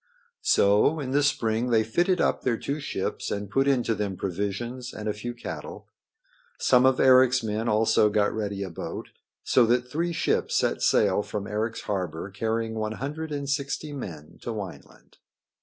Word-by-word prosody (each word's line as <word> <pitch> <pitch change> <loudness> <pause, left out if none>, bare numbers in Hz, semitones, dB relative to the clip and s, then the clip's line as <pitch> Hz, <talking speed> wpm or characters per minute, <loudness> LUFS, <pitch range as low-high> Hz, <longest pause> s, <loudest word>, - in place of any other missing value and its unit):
So 105 +10 +4
in 130 -3 -4
the 145 +2 +3
spring 120 -4 +1
they 110 -2 +4
fitted 175 - +1
up - - +1
their 120 -3 0
two 140 +6 -3
ships - - -3
and 100 0 -4
put 135 +5 +2
into 125 -4 +2
them 100 -3 -3
provisions 105 +7 -4
and 110 0 -5
a 105 - 0
few 120 +3 -6
cattle. 120 - -8 0.7
Some 125 +1 +4
of 130 -1 +2
Eric's 130 -1 +5
men 110 +1 -1
also 110 0 +4
got 105 0 +1
ready 100 -2 -3
a 95 - -6
boat, - - -6 0.3
so 125 - +4
that 125 +1 +1
three 170 +4 -1
ships 170 - 0
set - - +1
sail 100 -1 +3
from 105 -1 -5
Eric's 110 +2 -2
harbor 90 -2 -3
carrying 110 +2 -2
one 110 -1 -2
hundred 150 +6 -5
and 140 -1 -3
sixty 140 +2 -2
men 80 - -8
to - - -6
Wineland. 100 -5 -9
115 Hz, 175 wpm, -26 LUFS, 105-130 Hz, 0.7 s, Eric's